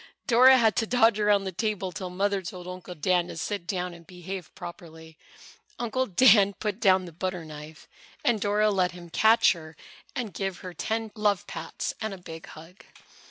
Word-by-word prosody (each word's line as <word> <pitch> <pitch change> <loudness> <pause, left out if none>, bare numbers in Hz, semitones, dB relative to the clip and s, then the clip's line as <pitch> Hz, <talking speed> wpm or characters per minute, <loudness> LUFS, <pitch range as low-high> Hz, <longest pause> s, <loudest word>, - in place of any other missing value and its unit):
Dora 260 +1 +7
had 225 -3 +3
to 225 -3 +1
dodge 230 -3 +3
around 205 -1 +3
the 190 - -4
table 195 0 -2
till 185 +1 -6
Mother 195 +2 0
told 180 0 -8
Uncle 180 0 -8
Dan 175 +2 +1
to - - -8
sit 195 +1 -4
down 180 -1 -2
and 170 -1 -15
behave 180 0 -7
properly. 160 -2 -10 0.6
Uncle 245 +2 -1
Dan 200 0 +5
put 210 0 -4
down 190 -4 +4
the 175 - -9
butter 180 0 -4
knife 150 0 -11 0.4
and 230 -4 +2
Dora 210 +1 +2
let 185 -2 +1
him 175 -1 -12
catch 220 +6 +5
her 160 -3 -8 0.4
and 225 -5 -4
give 195 -2 -4
her 180 - -6
ten 220 +3 -3
love 210 -3 0
pats - - -5
and 220 -3 -3
a - - -12
big 165 -2 -10
hug. 165 +4 -13
190 Hz, 185 wpm, -27 LUFS, 175-215 Hz, 0.6 s, Dora